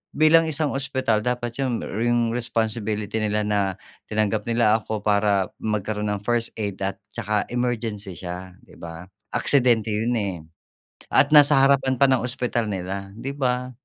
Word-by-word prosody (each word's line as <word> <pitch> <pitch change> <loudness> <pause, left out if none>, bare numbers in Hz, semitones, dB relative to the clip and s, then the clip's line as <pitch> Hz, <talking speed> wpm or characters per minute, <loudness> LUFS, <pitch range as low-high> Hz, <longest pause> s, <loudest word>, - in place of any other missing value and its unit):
bilang 160 +2 +5
isang 155 -1 -1
ospital 130 -5 0
dapat 125 0 -2
'yong 130 -4 -1
ring 120 +2 0
responsibility 110 -2 -2
nila 105 0 0
na 105 0 +1 0.5
tinanggap 105 0 -1
nila 115 -2 +3
ako 110 -1 -5
para 100 -2 +2
magkaroon 105 0 -2
ng 100 -1 -4
first 120 +1 0
aid 100 -3 -4
at 100 0 -1 0.2
saka 105 0 -1
emergency 115 -6 -2
siya, 90 +1 -7
'di - - -18
ba? 85 0 -8 0.3
Aksidente 120 -6 +3
yun, 115 +3 0
eh. 100 -5 -1 0.8
At - - +5
nasa 150 0 +7
harapan 135 -1 +3
pa 140 - +7
ng 130 -3 +2
ospital 120 -2 -1
nila, 95 0 -5
'di 130 +5 -5
ba? 125 -1 0
110 Hz, 150 wpm, -23 LUFS, 105-125 Hz, 0.8 s, nasa